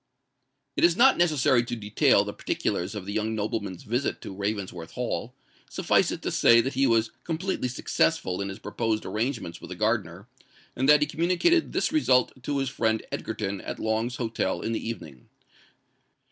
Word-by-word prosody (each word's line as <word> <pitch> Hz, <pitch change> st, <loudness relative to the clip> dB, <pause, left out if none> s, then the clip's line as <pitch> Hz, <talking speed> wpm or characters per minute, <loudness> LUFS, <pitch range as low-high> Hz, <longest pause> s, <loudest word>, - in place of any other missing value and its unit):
It -, -, 0 dB
is 170 Hz, +1 st, +5 dB
not 265 Hz, +3 st, +6 dB
necessary 145 Hz, -7 st, +3 dB
to 120 Hz, 0 st, -4 dB
detail 105 Hz, -2 st, +3 dB
the -, -, -5 dB
particulars 90 Hz, +4 st, -2 dB
of 100 Hz, -3 st, -5 dB
the 100 Hz, -, -5 dB
young 110 Hz, +1 st, -1 dB
nobleman's 105 Hz, -4 st, -3 dB
visit 120 Hz, +5 st, -1 dB
to -, -, -7 dB
Ravensworth 95 Hz, -4 st, -4 dB
Hall: 125 Hz, 0 st, -3 dB, 0.3 s
suffice -, -, +2 dB
it -, -, -5 dB
to -, -, -1 dB
say 115 Hz, -, +6 dB
that 130 Hz, +4 st, 0 dB
he 135 Hz, 0 st, +2 dB
was 115 Hz, -1 st, +2 dB
completely 170 Hz, -3 st, -2 dB
successful 95 Hz, -6 st, 0 dB
in 100 Hz, -, -3 dB
his 95 Hz, -, -6 dB
proposed 110 Hz, -1 st, -2 dB
arrangements 110 Hz, -7 st, -3 dB
with -, -, -10 dB
the 90 Hz, -, -6 dB
gardener, 105 Hz, -2 st, -1 dB, 0.5 s
and 130 Hz, +3 st, +1 dB
that 150 Hz, 0 st, +7 dB
he -, -, +4 dB
communicated 180 Hz, -, +2 dB
this -, -, 0 dB
result 130 Hz, -, +3 dB
to 145 Hz, +2 st, -2 dB
his 135 Hz, -1 st, 0 dB
friend 110 Hz, -4 st, 0 dB
Egerton 100 Hz, -3 st, -3 dB
at -, -, -6 dB
Long's 110 Hz, +3 st, -1 dB
Hotel 115 Hz, -6 st, -2 dB
in 115 Hz, -, -2 dB
the 115 Hz, -, -2 dB
evening. 75 Hz, -, -9 dB
115 Hz, 175 wpm, -26 LUFS, 100-135 Hz, 0.5 s, that